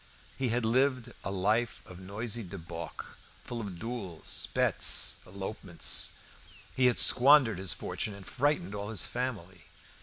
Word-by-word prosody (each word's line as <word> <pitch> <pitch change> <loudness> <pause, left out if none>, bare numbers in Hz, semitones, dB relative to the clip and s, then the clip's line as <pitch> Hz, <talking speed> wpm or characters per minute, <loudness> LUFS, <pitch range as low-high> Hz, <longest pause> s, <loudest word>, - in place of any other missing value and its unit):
He 130 -2 -1
had 120 0 0
lived 125 0 +1
a - - -3
life 105 +4 0
of 90 0 -11
noisy 105 +5 -4
debauch, 85 -4 -7 0.4
full 120 -1 -5
of 100 -5 -6
duels, 105 -7 -3
bets, - - +3
elopements; 95 -2 -2 0.6
he 130 -1 +5
had 125 - +2
squandered 130 -6 +6
his 95 -1 +2
fortune 105 - -3
and 100 -1 -11
frightened 145 -5 0
all 100 0 -4
his 110 -5 +2
family. 100 -9 -4
110 Hz, 140 wpm, -30 LUFS, 95-120 Hz, 0.6 s, squandered